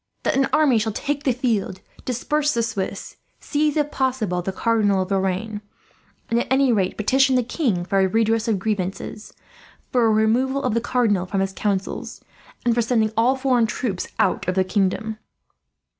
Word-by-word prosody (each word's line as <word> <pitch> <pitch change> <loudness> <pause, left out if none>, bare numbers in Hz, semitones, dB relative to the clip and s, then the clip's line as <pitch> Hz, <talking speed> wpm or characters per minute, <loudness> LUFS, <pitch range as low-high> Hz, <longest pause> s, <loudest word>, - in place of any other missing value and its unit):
That - - +1
an 270 0 +2
army 295 -7 +4
shall 215 0 -2
take 290 +4 -3
the 265 - +4
field, 225 -6 -1 0.3
disperse 295 +4 0
the 230 - +1
Swiss, 205 -4 -4 0.2
seize 300 0 0
if 295 -1 0
possible 245 -9 -1
the 190 - -3
Cardinal 205 -2 +1
of 185 - -9
Lorraine; 195 +2 -1 0.7
and 230 - +1
at - - -2
any 265 -1 +3
rate 195 -5 0
petition 265 +5 +3
the 250 - +3
king 225 - -1
for 195 +1 +1
a 190 - +4
redress 225 +2 +1
of 220 -3 +2
grievances, 200 +1 -4 0.6
for 245 -3 +3
a - - +3
removal 240 +6 +2
of 250 - 0
the 230 - +1
Cardinal 225 -6 +1
from 195 +1 -1
his 195 0 -1
councils, 200 -1 -3 0.5
and 240 - +3
for 240 - +2
sending 225 -2 +1
all 235 +4 +3
foreign 255 -4 +2
troops 210 -4 -3
out - - +1
of 185 - 0
the 190 - +3
kingdom. 205 +3 -1
225 Hz, 180 wpm, -22 LUFS, 195-255 Hz, 0.7 s, army